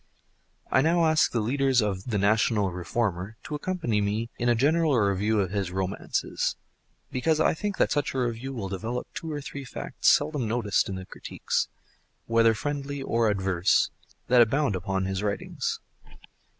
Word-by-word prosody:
I 130 - +5
now 165 +3 +3
ask 155 0 +3
the 115 - 0
leaders 135 +3 +2
of 100 -4 -1
the 110 -4 -1
National 105 0 +2
Reformer 95 +3 -2
to - - -7
accompany 150 - -1
me 105 +3 -1
in 120 - +1
a 120 - +4
general 150 +3 +3
review 105 +1 +2
of 95 -3 0
his 100 -3 -1
romances, 95 +1 -2 0.6
because 155 +5 +1
I 160 - +4
think 200 +4 -3
that - - +2
such 145 -2 0
a - - 0
review 120 +2 -2
will 115 -7 -4
develop 110 +6 -4
two 160 - -5
or 145 -1 -3
three 140 0 -7
facts 125 - -4
seldom 145 -5 +3
noticed 110 -4 +1
in 95 - -3
the 95 0 -7
critiques—whether 115 +3 -2
friendly 140 +2 -3
or 115 -3 +2
adverse—that 100 +5 +1
abound 125 0 +2
upon 95 +1 -2
his 95 0 -2
writings. 105 -1 -2
115 Hz, 160 wpm, -27 LUFS, 100-140 Hz, 0.6 s, I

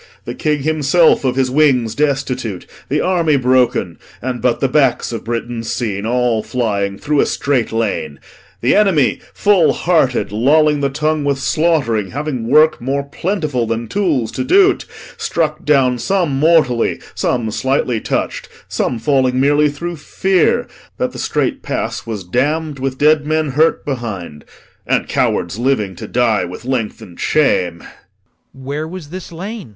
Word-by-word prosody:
The - - -4
King 150 -2 -1
himself 155 +2 +3
Of 130 -2 0
his 130 -1 +1
wings 130 -6 +3
destitute, 130 -7 -2 0.2
the - - +1
army 170 -5 +2
broken, 125 - +1 0.2
And 125 0 -4
but 120 -2 +1
the 135 - +2
backs 130 -3 +1
of 115 - -5
Britons 115 -1 -4
seen, 105 -3 -2
an 120 -2 +1
flying, 100 -5 -2
Through 150 +5 0
a - - +3
strait 135 -6 0
lane 100 -10 -2 0.4
the 120 - +3
enemy, 190 -10 +3
full 200 -5 +3
hearted, 155 - +1
Lolling 150 +7 +3
the 140 -1 0
tongue 150 +2 -1
with 140 -1 0
slaught'ring, 140 - +1
having 140 -5 -3
work 155 +3 +4
More 135 +3 -1
plentiful 150 - -2
than 115 +1 -2
tools 145 - 0
to - - -3
do't, 385 +6 +3 0.3
struck 155 -2 -2
down 130 -4 +3
Some 180 +1 0
mortally, 150 -7 +3
some 115 -3 -1
slightly 130 -2 0
touch'd, - - -3 0.2
some 120 - -1
falling 130 -1 +1
Merely 145 +2 +3
through 170 +4 -5
fear, 185 +4 +1 0.3
that - - -1
the - - -9
strait - - -1
pass - - -4
was 105 -4 -4
damm'd 145 - -1
With 130 0 -3
dead 150 +1 +3
men 155 -1 0
hurt 155 +5 +2
behind, 105 - -5 0.4
and - - +1
cowards 90 +5 -1
living 120 -7 0
To - - -7
die 115 -5 +1
with 90 +6 -8
length'ned 115 -8 -4
shame. 90 - +1
LORD. - - -13 0.7
Where 150 +3 -3
was 170 -3 -8
this 185 -1 -8
lane? 195 - -7
135 Hz, 155 wpm, -17 LUFS, 115-155 Hz, 0.7 s, work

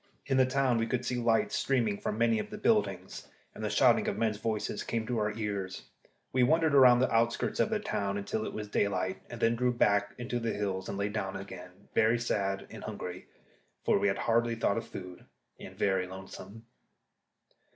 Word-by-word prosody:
In 135 -1 +1
the 130 -1 +5
town 130 -2 +2
we 115 - 0
could 125 +1 -1
see 125 +1 -1
lights 115 -3 +2
streaming 115 -7 +1
from 105 - -3
many 115 -1 +3
of - - -4
the - - -7
buildings, 100 -4 0 0.3
and - - -8
the - - 0
shouting - - +4
of - - -1
men's 110 -2 0
voices 110 -2 -2
came 115 -1 -2
to 120 -1 -1
our 105 0 0
ears. 100 -4 -3 0.5
We 130 - +3
wandered 160 +4 +3
round 125 -2 +7
the 130 - +1
outskirts 115 +1 +1
of - - +3
the 215 -1 0
town 100 - -2
till 110 - -2
it - - -4
was 105 -1 -5
daylight, 95 -2 0
and 120 - -7
then 115 0 +3
drew 125 +1 +1
back 100 -4 +2
into 120 0 -3
the 115 -1 -1
hills 95 -2 -3
and 100 - -4
lay 100 +1 -1
down 105 -2 -3
again, 90 -2 -10
very 110 +2 +4
sad 100 -4 -1
and - - -9
hungry 90 0 -6 0.6
for - - +3
we - - +2
had 95 0 +1
hardly 115 +1 +1
thought 115 - +1
of 115 - -9
food 90 -1 -9 0.3
and - - -10
very 95 -2 +1
lonesome. 95 +4 -10
110 Hz, 205 wpm, -30 LUFS, 100-120 Hz, 0.6 s, round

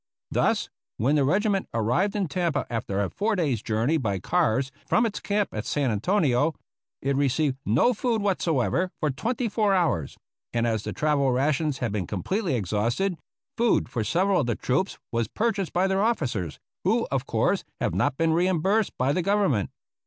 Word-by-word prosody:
Thus, - - +1 0.3
when 125 +7 +2
the 145 -2 +3
regiment 195 +6 +1
arrived 165 - +1
in 200 -3 0
Tampa 160 -2 -1
after 100 -3 -1
a 95 - -3
four 215 +1 0
days' 145 - 0
journey 115 +9 +1
by 105 -9 -1
cars 135 - +1 0.2
from 235 - +3
its 220 - -2
camp 205 0 0
at 105 - -3
San 140 -4 0
Antonio, 145 - +1 0.5
it 140 0 +1
received 140 0 +1
no 115 - +4
food 230 0 0
whatever 180 - +1
for 150 -2 +1
twenty 235 - -2
four 210 -2 +2
hours, 160 - 0 0.4
and 120 0 +1
as 110 -2 0
the - - -3
travel 145 -3 +1
rations 140 +2 +1
had 120 -4 -2
been 100 -4 -2
completely 170 - -1
exhausted, 115 - 0 0.4
food 235 0 +2
for 115 - -2
several 185 - +2
of 125 - -2
the 120 - 0
troops 185 +10 -1
was 115 -2 0
purchased 210 - -1
by 180 +2 +2
their 190 0 +1
officers, 125 - -1 0.3
who, - - +2
of - - -1
course, - - +1 0.2
have - - 0
not 130 - 0
been 165 -1 +2
reimbursed 185 +5 +1
by 130 +3 +1
the 180 - +1
Government. 195 - +1
150 Hz, 175 wpm, -26 LUFS, 120-195 Hz, 0.5 s, no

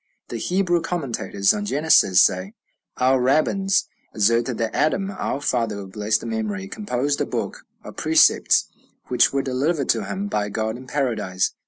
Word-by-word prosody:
The 120 - -4
Hebrew 175 - +1
commentators 120 - -1
on 205 0 -3
Genesis 145 - +4
say, 95 +3 0 0.4
"Our 130 0 +3
rabbins 185 +9 +1 0.3
assert 115 +3 +2
that 115 -3 -3
Adam, 195 +6 0
our 185 -7 -3
father 115 -7 -1
of 95 -1 -8
blessed 110 +2 -1
memory, 105 -4 -3
composed 145 - -2
a - - +1
book - - -5 0.2
of - - -11
precepts, 320 0 +4 0.4
which - - +3
were 140 0 -1
delivered 140 +3 -1
to 110 -3 +1
him 100 0 -4
by 105 0 -2
God 110 +1 -2
in 130 +1 -11
Paradise." 110 -10 -1
120 Hz, 155 wpm, -22 LUFS, 105-155 Hz, 0.4 s, Genesis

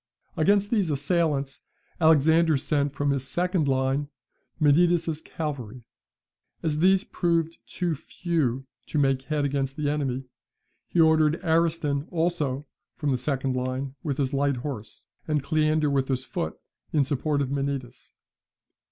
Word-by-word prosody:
Against 200 +5 +3
these 205 -7 +2
assailants 145 -1 0 0.4
Alexander 160 0 +5
sent 145 0 0
from 145 0 +1
his 135 -1 -1
second 180 -1 0
line 135 +2 0 0.5
Menidas's 160 +1 +3
cavalry. 130 -8 -5 0.8
As 155 -2 0
these 190 +3 +4
proved 170 -4 -1
too 175 -2 -1
few 140 -4 -2 0.2
to - - -3
make 135 -2 +2
head 150 0 0
against 135 0 -1
the 145 -1 0
enemy, 135 -3 -2 0.6
he 175 - -1
ordered 160 0 +4
Ariston 160 -3 +1
also 160 -5 -1 0.3
from 150 -2 -1
the 130 - +1
second 130 -1 -1
line 130 +1 -2
with 140 -3 -2
his 140 -1 -1
light 140 0 +1
horse, 120 -5 -7 0.2
and 150 -3 0
Cleander 155 -1 +2
with 135 -1 +1
his 130 -1 -1
foot, 80 - -4 0.3
in 150 -3 +3
support 145 +2 0
of 140 -2 -1
Menidas. 135 -3 -4
145 Hz, 135 wpm, -26 LUFS, 135-160 Hz, 0.8 s, Alexander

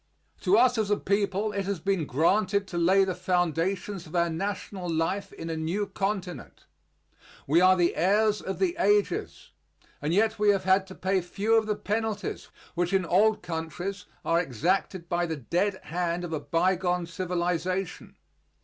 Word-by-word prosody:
To 195 +2 +3
us 245 0 +4
as 210 -2 0
a 205 - +3
people 200 +1 0
it 200 -2 -2
has 200 -2 -2
been 180 -3 -1
granted 195 +7 +2
to 175 - -4
lay 190 +3 +4
the 190 -1 -1
foundations 180 +1 -1
of 160 - -9
our 170 -1 +2
national 190 +1 -4
life 165 +5 -1
in 165 - -8
a 165 - -2
new 165 +6 -1
continent. 195 - -4 0.8
We 160 +5 +4
are 185 0 +6
the 175 -1 +2
heirs 210 +4 +2
of 190 - -4
the 360 -2 +1
ages, 205 0 0 0.5
and 150 +2 -1
yet 220 +4 +2
we 210 0 +4
have 200 -2 +3
had 190 +1 +3
to 190 - -10
pay 190 0 0
few 200 +5 -1
of 220 -1 +3
the 210 - 0
penalties 215 +1 -3 0.3
which 175 +2 -1
in 190 -2 +2
old 210 +5 +3
countries 175 +3 -5 0.2
are 165 - +3
exacted 175 - -1
by 175 0 0
the 160 -1 -3
dead 185 - -1
hand 175 +1 -2
of 170 -2 -5
a 155 - -1
bygone 180 +2 0
civilization. 180 +1 -2
185 Hz, 170 wpm, -27 LUFS, 170-200 Hz, 0.8 s, are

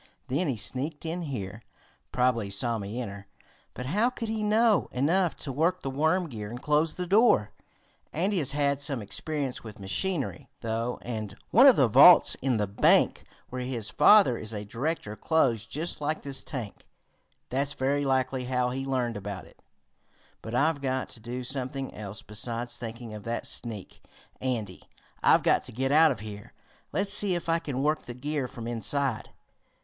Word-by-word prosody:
Then 145 +7 0
he 130 -5 -1
sneaked 140 +8 -2
in 165 +2 -3
here. 110 - -5 0.5
Probably 125 -4 +1
he - - -8
saw 115 +3 0
me 105 +4 -5
enter, 100 -4 -7 0.5
but 125 - -6
how 210 - +2
could 230 -3 -5
he 220 -1 -2
know 215 -1 +3
enough 170 +7 +1
to 140 - -5
work 165 +7 0
the 135 - -3
worm 160 +6 +1
gear 105 -7 -7
and 120 +2 -7
close 150 +3 +1
the 180 - -3
door? 190 - +4 0.6
Andy 190 +4 0
has 140 -5 +2
had 140 -1 +1
some 140 -6 0
experience 140 +5 -3
with 110 -2 -10
machinery, 140 - -3
though, 115 +1 -2
and 110 -4 -5 0.2
one - - +8
of - - +8
the - - +4
vaults - - +8
in 130 -3 +1
the 105 - +1
bank 100 +1 +3 0.2
where 125 0 -5
his 125 -4 -4
father 200 - +6
is 110 0 -6
a 105 0 -5
director 115 0 -3
closed 115 -4 +1
just 160 +1 -1
like 155 +2 -2
this 140 -1 -3
tank. 120 -7 -7 0.6
That's 140 +3 0
very 140 +2 0
likely 130 -1 0
how 125 -1 0
he 135 +1 -4
learned 125 -4 -1
about 100 -2 -6
it. - - -20 0.8
But 115 +1 -6
I've 145 +2 +2
got 130 -1 -2
to - - -11
do 120 +3 -6
something 135 +1 -4
else 105 -1 -8
besides 115 +3 -3
thinking 115 -1 -7
of 105 - -7
that 115 0 -3
sneak, 110 -6 -4 0.4
Andy. 110 -8 -3 0.4
I've - - +5
got - - +3
to - - -5
get 135 +4 -1
out 160 +2 +6
of 130 -8 -3
here. 105 +1 -9 0.4
Let's 200 0 +1
see 205 -3 +3
if 175 - -4
I 165 0 +2
can 140 -5 -3
work 155 +1 0
the 120 - -6
gear 140 +1 -3
from 115 -1 -8
inside." 120 +2 -1
130 Hz, 180 wpm, -28 LUFS, 115-155 Hz, 0.8 s, one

